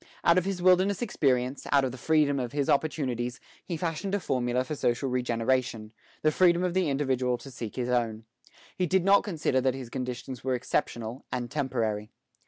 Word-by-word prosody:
Out 170 +1 +5
of 180 - -5
his 190 -2 -2
wilderness 185 +2 +4
experience, 130 - 0
out 140 -2 +4
of 130 - -2
the 130 - -8
freedom 150 -2 +2
of 125 -1 -4
his 140 -1 +1
opportunities, 130 -5 -1 0.2
he 170 - -4
fashioned 170 +4 -2
a - - 0
formula 125 -6 0
for 130 - -5
social 130 -1 0
regeneration, 120 -2 0 0.3
the 155 - +4
freedom 175 +1 +4
of 180 -1 0
the 185 -4 +1
individual 130 -3 0
to 135 - -11
seek 115 -3 -6
his 125 -2 -2
own. 115 -3 0 0.5
He 180 - 0
did 185 +1 +2
not 200 +1 +6
consider 160 -9 0
that 130 0 +1
his 130 -3 -8
conditions 125 0 -5
were 130 0 +1
exceptional 120 0 -2
and 120 -1 -3
temporary. 115 -7 -1
130 Hz, 190 wpm, -28 LUFS, 125-160 Hz, 0.5 s, not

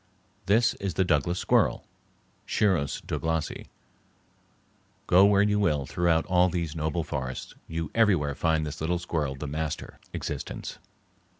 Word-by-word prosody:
This 115 +3 +4
is 95 -5 -3
the 95 - +3
Douglas 85 +2 +1
squirrel - - +2 0.6
(Sciurus 90 -10 +1
Douglasi). 80 -1 -2 1.4
Go 95 +2 +6
where 100 0 +5
you 105 0 +2
will 75 -9 +1
throughout 85 +3 +1
all 90 -1 +3
these 85 -3 -3
noble 80 +1 -1
forests, 65 -5 -5
you 80 -1 -4
everywhere 95 -11 +3
find 80 +1 +1
this 75 +1 -6
little 85 +2 0
squirrel 80 -5 -2
the 70 - -6
master 75 +1 -4
existence. - - -5
80 Hz, 130 wpm, -27 LUFS, 75-90 Hz, 1.4 s, Go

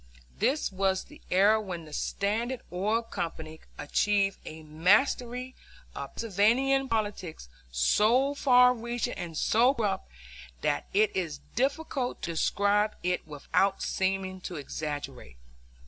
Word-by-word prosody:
This 285 -2 +1
was 190 0 0
the - - -16
era 205 +4 +4
when 175 -5 -6
the 150 - -12
Standard 230 +9 -2
Oil 210 +6 0
Company 160 -7 -6 0.2
achieved 195 +5 +1
a 155 0 -8
mastery 235 - +1 0.4
of - - -7
Pennsylvania 235 +6 +2
politics 205 - -3 0.2
so 220 - +3
far 250 -3 +5
reaching 240 +1 -3
and 170 -3 -6
so 245 - +3
corrupt 200 - -2 0.5
that 145 - 0
it 210 +1 +2
is 160 -6 -3
difficult 270 0 -1
to 170 - -2
describe 205 +5 +1
it 180 -2 -1
without 190 +6 0
seeming 190 0 -1
to 180 - -6
exaggerate. 145 - -6
200 Hz, 120 wpm, -28 LUFS, 170-235 Hz, 0.5 s, far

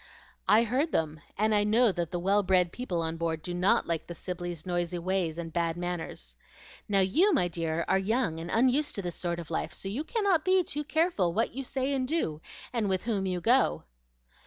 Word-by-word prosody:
"I 220 +2 +6
heard 265 +8 0
them, 155 -1 -1 0.2
and 215 +1 +2
I 205 -1 +3
know 220 +2 +4
that 175 -3 -3
the 175 - -3
well 195 +4 +3
bred 185 -2 +2
people 180 -10 -3
on 160 0 -3
board 165 -1 -2
do 180 - -4
not 180 +3 +2
like 165 -2 -2
the 175 - -7
Sibleys' 175 -2 -5
noisy 175 -1 -1
ways 175 -2 -1
and 165 -2 -6
bad 170 -1 0
manners. 170 - -5 0.5
Now, 200 -1 +3
you, 320 - +4
my 265 - +3
dear, 165 -1 -2
are 190 - +3
young 200 -4 0
and 165 +1 -6
unused 260 +7 +2
to 200 - -3
this 175 -2 -3
sort 170 -1 -2
of 170 -2 -8
life; 160 - -2
so - - -6
you 230 +10 -2
cannot 395 -5 +1
be 370 0 +4
too 295 -2 -4
careful 310 - +1
what 230 - +1
you 270 +3 -4
say 265 +2 -1
and 260 -2 0
do, 165 - -1 0.3
and 225 -4 0
with 190 -1 0
whom 205 -5 -1
you 180 -1 -2
go." 225 - +3
185 Hz, 215 wpm, -29 LUFS, 170-245 Hz, 0.5 s, I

